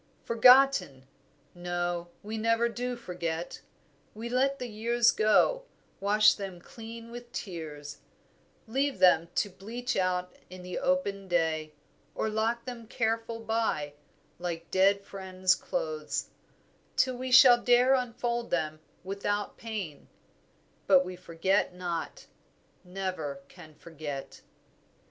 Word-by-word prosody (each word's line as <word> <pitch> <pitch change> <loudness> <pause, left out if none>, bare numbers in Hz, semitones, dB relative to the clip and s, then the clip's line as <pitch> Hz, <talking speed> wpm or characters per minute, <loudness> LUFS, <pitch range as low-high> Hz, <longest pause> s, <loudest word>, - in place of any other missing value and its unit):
"Forgotten! 250 - +5 0.5
no, 175 -1 -3 0.2
we 215 +2 -5
never 230 +1 +2
do 245 +1 -3
forget; 175 -6 -5 0.5
We 230 +2 -6
let 270 +3 +1
the 250 - -5
years 235 +2 +2
go; 235 - +3 0.3
wash 210 +2 +5
them 195 -3 -7
clean 230 +4 -10
with 240 0 -9
tears, 155 - -7 0.7
Leave 270 +3 -1
them 180 -3 +5
to 205 - +1
bleach 240 +7 -4
out 180 -1 0 0.2
in 185 0 -10
the 180 0 -4
open 265 -8 0
day 160 -3 0 0.4
Or 220 - -1
lock 225 +2 -1
them 240 -3 -7
careful 225 0 -2
by, 220 -11 -1 0.5
like 170 -1 -5
dead 195 +1 +3
friends' 185 -1 0
clothes, - - -3 0.7
Till 255 -1 +2
we 255 +1 -4
shall 250 -2 +8
dare 245 +2 +5
unfold 240 -2 -1
them 155 -2 -1 0.2
without 200 +2 -2
pain; 205 -10 -6 0.8
But 185 -2 +6
we 180 0 -6
forget 180 +2 0
not, 175 -2 -4 0.6
never 180 -7 -4
can 160 -4 -14
forget." 150 -5 -8
205 Hz, 115 wpm, -29 LUFS, 175-235 Hz, 0.8 s, shall